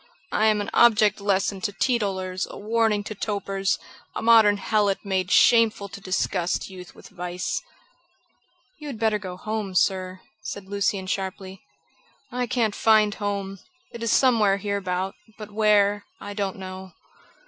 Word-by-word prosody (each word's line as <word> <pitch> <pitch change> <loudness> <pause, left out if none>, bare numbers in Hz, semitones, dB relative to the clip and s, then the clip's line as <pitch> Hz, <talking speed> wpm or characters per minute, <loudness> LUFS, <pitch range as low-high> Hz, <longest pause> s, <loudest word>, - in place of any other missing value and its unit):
"I 215 - +2
am 210 -1 +2
an 205 - -5
object 215 -3 +4
lesson 195 -1 0
to 205 - -1
teetotalers; 195 -6 -1
a - - -9
warning 220 -1 +1
to 215 - -6
topers; 200 -2 -2 0.4
a - - -3
modern 220 -3 +6
helot 205 -1 0
made 190 -2 -1
shameful 220 +1 +4
to 200 +1 -10
disgust 185 -1 -1
youth 180 -1 -11
with - - -14
vice." 180 -1 -4 1.2
"You 300 - -8
had 270 -5 -6
better 220 -1 +1
go 185 -3 -7
home, 215 -1 -4
sir," 185 0 0 0.2
said 200 -2 -7
Lucian 200 -1 -1
sharply. 190 0 -4 0.7
"I 250 0 -2
can't 230 -4 0
find 215 -1 +4
home. 200 -2 -4 0.3
It 235 - -9
is 230 -2 0
somewhere 220 -7 +4
hereabout, 195 -2 -2 0.2
but 210 -1 -9
where, 205 -1 +3
I 205 - -7
don't 200 -2 -2
know." 185 -1 -8
200 Hz, 150 wpm, -24 LUFS, 190-215 Hz, 1.2 s, modern